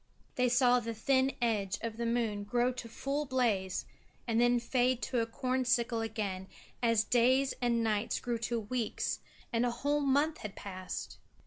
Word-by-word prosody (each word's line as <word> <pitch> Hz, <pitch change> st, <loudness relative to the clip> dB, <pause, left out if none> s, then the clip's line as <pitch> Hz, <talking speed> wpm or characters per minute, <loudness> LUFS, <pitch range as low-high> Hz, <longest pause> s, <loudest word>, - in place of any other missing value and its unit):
They 250 Hz, 0 st, +2 dB
saw 245 Hz, 0 st, +5 dB
the 230 Hz, -1 st, -5 dB
thin 260 Hz, +4 st, +2 dB
edge 210 Hz, -4 st, 0 dB
of 225 Hz, -1 st, -4 dB
the 235 Hz, 0 st, -1 dB
moon 230 Hz, -3 st, 0 dB
grow 245 Hz, +4 st, +1 dB
to 245 Hz, -2 st, -7 dB
full 280 Hz, +5 st, -2 dB
blaze 225 Hz, -8 st, 0 dB, 0.4 s
and 230 Hz, 0 st, +2 dB
then 240 Hz, 0 st, +4 dB
fade 250 Hz, +1 st, +1 dB
to 250 Hz, -, 0 dB
a 230 Hz, -, 0 dB
corn 255 Hz, +3 st, -1 dB
sickle 235 Hz, -2 st, +1 dB
again 205 Hz, -4 st, -3 dB, 0.3 s
as 230 Hz, -2 st, +3 dB
days 255 Hz, +4 st, +3 dB
and 235 Hz, -1 st, +2 dB
nights 215 Hz, 0 st, 0 dB
grew 240 Hz, -1 st, -2 dB
to 235 Hz, 0 st, -1 dB
weeks 225 Hz, +1 st, -2 dB, 0.3 s
and 230 Hz, +1 st, +2 dB
a 245 Hz, -, +2 dB
whole 285 Hz, +5 st, 0 dB
month 285 Hz, +3 st, +2 dB
had 210 Hz, -2 st, -7 dB
passed. 185 Hz, -2 st, -6 dB
235 Hz, 175 wpm, -32 LUFS, 225-255 Hz, 0.4 s, saw